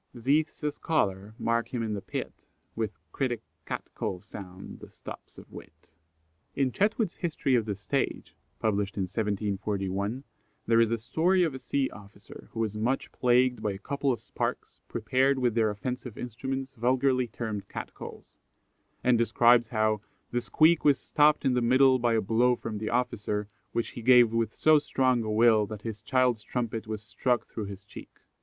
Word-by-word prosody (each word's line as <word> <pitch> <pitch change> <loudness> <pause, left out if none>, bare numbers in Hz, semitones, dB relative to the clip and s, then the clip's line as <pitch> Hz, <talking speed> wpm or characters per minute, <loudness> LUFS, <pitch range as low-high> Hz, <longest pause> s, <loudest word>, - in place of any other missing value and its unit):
Zethe's 145 +7 +1
a 150 - +1
scholar 105 -10 -1
mark 115 0 0
him 120 -2 -2
in 110 -1 -2
the 100 - -3
pit, - - -5 0.4
With 110 -2 -3
critic 125 -4 -2 0.2
Cat - - -3
call 90 - -3
sound 95 -2 -10
the - - -12
stops - - -11
of - - -13
wit." - - -13 0.7
In 135 -2 +1
Chetwood's 210 - 0
History 155 -5 -1
of 115 -3 +3
the 105 -2 -2
Stage 100 - -2 0.3
(1741), 100 +1 -1 0.4
there 115 0 +4
is 115 - +3
a 115 - 0
story 175 - +2
of 160 -5 0
a 130 - -6
sea 140 0 0
officer 100 0 -13
who 115 - -6
was 110 -2 -1
much 120 +5 -1
plagued 125 0 +2
by 105 - -1
"a - - -6
couple 140 +6 -1
of 120 - -2
sparks, - - -4
prepared 130 +4 +1
with 125 -3 +1
their 110 -1 +2
offensive 125 +3 -5
instruments, 130 +3 -4
vulgarly 130 +1 +2
termed 110 -3 -5
Cat - - -6
calls;" - - -11 0.6
and 125 -2 +4
describes 115 0 +4
how 110 -2 +1 0.3
"the 120 - 0
squeak 160 +6 +4
was 145 -2 +5
stopped 150 -1 +3
in 130 - +3
the 125 - +2
middle 130 +2 +5
by 120 -1 +2
a 110 - +2
blow 120 +4 +3
from 110 -3 -5
the 110 - -3
officer, 105 -4 -1 0.2
which 115 - -1
he 120 - -8
gave 120 -1 +6
with 115 -2 -1
so 155 -1 +6
strong 130 -4 +1
a 110 - -3
will 110 -1 +4
that 105 0 -8
his 110 -2 -5
child's 125 0 +2
trumpet 115 -2 -3
was 110 -1 -5
struck 120 +3 0
through 110 - -6
his 100 -1 -8
cheek." - - -13
115 Hz, 175 wpm, -28 LUFS, 105-130 Hz, 0.7 s, gave